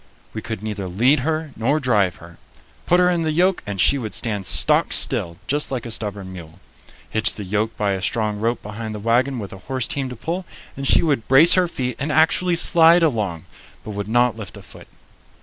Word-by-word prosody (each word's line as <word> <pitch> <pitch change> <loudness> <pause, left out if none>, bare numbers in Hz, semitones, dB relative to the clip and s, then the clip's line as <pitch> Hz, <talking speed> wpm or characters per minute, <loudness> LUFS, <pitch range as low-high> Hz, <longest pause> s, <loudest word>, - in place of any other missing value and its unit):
We 110 - -5
could 110 -2 -6
neither 105 -3 -4
lead 120 +11 +2
her 155 +2 -2
nor 135 +8 0
drive 105 - +1
her. 85 0 -15 0.5
Put 175 - +4
her 180 - +4
in 175 -1 0
the 160 -1 -1
yoke, 180 +4 +1
and 100 -1 -5
she 140 - +3
would 110 -4 -6
stand 105 -5 -2
stock - - +3
still, 85 0 -1
just 145 +5 0
like 125 -3 -4
a 115 - -6
stubborn 100 -4 -5
mule. 85 0 -12 0.5
Hitch 110 -1 0
the 105 - -6
yoke 105 +3 -2
by 105 -1 0
a 95 -1 -3
strong 105 0 -2
rope 115 +2 -2
behind 110 +1 -6
the - - -6
wagon 120 +5 +1
with 100 -4 -7
a 95 - -10
horse 130 -3 -1
team 135 -2 -3
to 125 - -7
pull, 170 +10 -4 0.3
and 135 0 -4
she - - +4
would 140 -9 0
brace 145 +6 +7
her 185 -1 +3
feet 125 -7 -4
and 150 +2 -2
actually 165 +4 +2
slide 170 0 +5
along, 105 - -1 0.4
but 110 - -7
would 100 0 -5
not 120 0 +2
lift 100 -6 -9
a - - -12
foot. - - -12
115 Hz, 220 wpm, -21 LUFS, 105-145 Hz, 0.5 s, brace